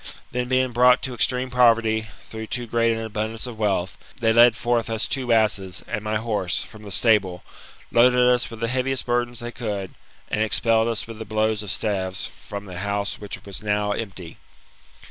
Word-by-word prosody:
Then, 125 Hz, 0 st, -2 dB
being 130 Hz, 0 st, +1 dB
brought 125 Hz, +1 st, +5 dB
to 130 Hz, -, -2 dB
extreme 125 Hz, +3 st, +1 dB
poverty, 115 Hz, -3 st, +3 dB, 0.2 s
through 110 Hz, 0 st, -7 dB
too 120 Hz, +1 st, -3 dB
great 115 Hz, 0 st, +2 dB
an 115 Hz, 0 st, -2 dB
abundance 110 Hz, +1 st, -3 dB
of 120 Hz, -3 st, -7 dB
wealth, 95 Hz, -4 st, -1 dB, 0.2 s
they 110 Hz, -2 st, +3 dB
led 120 Hz, 0 st, +7 dB
forth 120 Hz, 0 st, 0 dB
us 115 Hz, 0 st, -1 dB
two 130 Hz, -3 st, -1 dB
asses, 105 Hz, -5 st, +1 dB
and 110 Hz, -2 st, -3 dB
my 110 Hz, 0 st, -2 dB
horse, 105 Hz, -6 st, -1 dB
from 110 Hz, -, -13 dB
the 105 Hz, -, -9 dB
stable, 95 Hz, -3 st, +2 dB, 0.5 s
loaded 125 Hz, +1 st, +5 dB
us 125 Hz, -1 st, +2 dB
with 115 Hz, -1 st, -10 dB
the 115 Hz, -, +1 dB
heaviest 130 Hz, +2 st, -1 dB
bur 120 Hz, 0 st, +1 dB
dens 120 Hz, 0 st, -10 dB
they 120 Hz, 0 st, -5 dB
could, 105 Hz, -5 st, -4 dB, 0.4 s
and 105 Hz, -, 0 dB
expelled 115 Hz, +1 st, +2 dB
us 115 Hz, -3 st, -2 dB
with 115 Hz, -1 st, -10 dB
the -, -, -4 dB
blows 110 Hz, 0 st, 0 dB
of 105 Hz, -, -6 dB
staves 95 Hz, -2 st, -1 dB
from 100 Hz, 0 st, -8 dB
the 90 Hz, -2 st, -7 dB
house 100 Hz, +1 st, -2 dB
which 105 Hz, -1 st, -7 dB
was 100 Hz, +1 st, -6 dB
now 105 Hz, -1 st, 0 dB
empty. 95 Hz, -6 st, -6 dB
110 Hz, 195 wpm, -23 LUFS, 105-120 Hz, 0.5 s, led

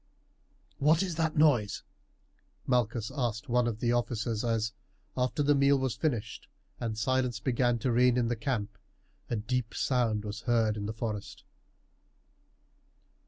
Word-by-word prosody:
"What 155 Hz, +5 st, +4 dB
is 185 Hz, -3 st, -2 dB
that 160 Hz, -1 st, 0 dB
noise?" 135 Hz, -10 st, +3 dB, 0.8 s
Malchus 120 Hz, -3 st, 0 dB
asked 120 Hz, -5 st, -2 dB
one 125 Hz, 0 st, +2 dB
of 110 Hz, -2 st, -3 dB
the 120 Hz, 0 st, +1 dB
officers 115 Hz, -2 st, -1 dB
as, 115 Hz, -2 st, 0 dB, 0.4 s
after 130 Hz, +4 st, 0 dB
the 145 Hz, +1 st, +4 dB
meal 140 Hz, 0 st, +4 dB
was 130 Hz, -3 st, -1 dB
finished 125 Hz, -10 st, -3 dB, 0.3 s
and 110 Hz, -2 st, -3 dB
silence 125 Hz, 0 st, 0 dB
began 120 Hz, +1 st, +1 dB
to 125 Hz, +2 st, -1 dB
reign 125 Hz, +1 st, +4 dB
in 120 Hz, -2 st, +2 dB
the 120 Hz, -, 0 dB
camp, 110 Hz, -5 st, -3 dB, 0.5 s
a 120 Hz, -, 0 dB
deep 115 Hz, +2 st, -2 dB
sound 115 Hz, -5 st, +1 dB
was 105 Hz, +2 st, -5 dB
heard 115 Hz, -3 st, +3 dB
in 105 Hz, -1 st, -4 dB
the -, -, -2 dB
forest. 110 Hz, -3 st, -5 dB
120 Hz, 145 wpm, -30 LUFS, 110-130 Hz, 0.8 s, What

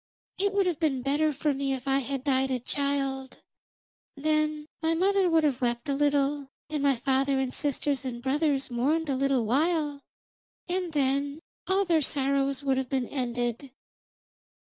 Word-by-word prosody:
It 400 Hz, +1 st, +2 dB
would 400 Hz, -1 st, +3 dB
have 350 Hz, -4 st, -1 dB
been 275 Hz, -6 st, 0 dB
better 295 Hz, +3 st, +2 dB
for 295 Hz, +1 st, 0 dB
me 275 Hz, 0 st, -1 dB
if 260 Hz, 0 st, -6 dB
I 270 Hz, 0 st, +3 dB
had 270 Hz, 0 st, -4 dB
died 265 Hz, -2 st, +2 dB
a 260 Hz, -, 0 dB
child; 270 Hz, 0 st, -2 dB, 0.8 s
then 305 Hz, +1 st, 0 dB, 0.2 s
my 325 Hz, 0 st, +2 dB
mother 385 Hz, +1 st, +3 dB
would 325 Hz, -1 st, +3 dB
have 275 Hz, -4 st, +1 dB
wept 240 Hz, +2 st, -1 dB
a 280 Hz, -, +1 dB
little, 285 Hz, 0 st, +1 dB, 0.2 s
and 300 Hz, -2 st, -1 dB
my 280 Hz, -1 st, +3 dB
father 270 Hz, +2 st, +1 dB
and 260 Hz, -1 st, -1 dB
sisters 285 Hz, -1 st, -1 dB
and 250 Hz, -2 st, -4 dB
brothers 275 Hz, +1 st, 0 dB
mourned 295 Hz, +6 st, 0 dB
a 275 Hz, -, +1 dB
little 270 Hz, -3 st, +1 dB
while, 295 Hz, +3 st, +1 dB, 0.7 s
and 360 Hz, -1 st, -2 dB
then 280 Hz, +1 st, 0 dB, 0.3 s
all 390 Hz, +1 st, +2 dB
their 335 Hz, -3 st, +3 dB
sorrow 275 Hz, 0 st, +1 dB
would 270 Hz, -2 st, +1 dB
have 260 Hz, -2 st, -4 dB
been 260 Hz, -3 st, 0 dB
ended.' 245 Hz, 0 st, -2 dB
280 Hz, 165 wpm, -28 LUFS, 265-305 Hz, 0.8 s, would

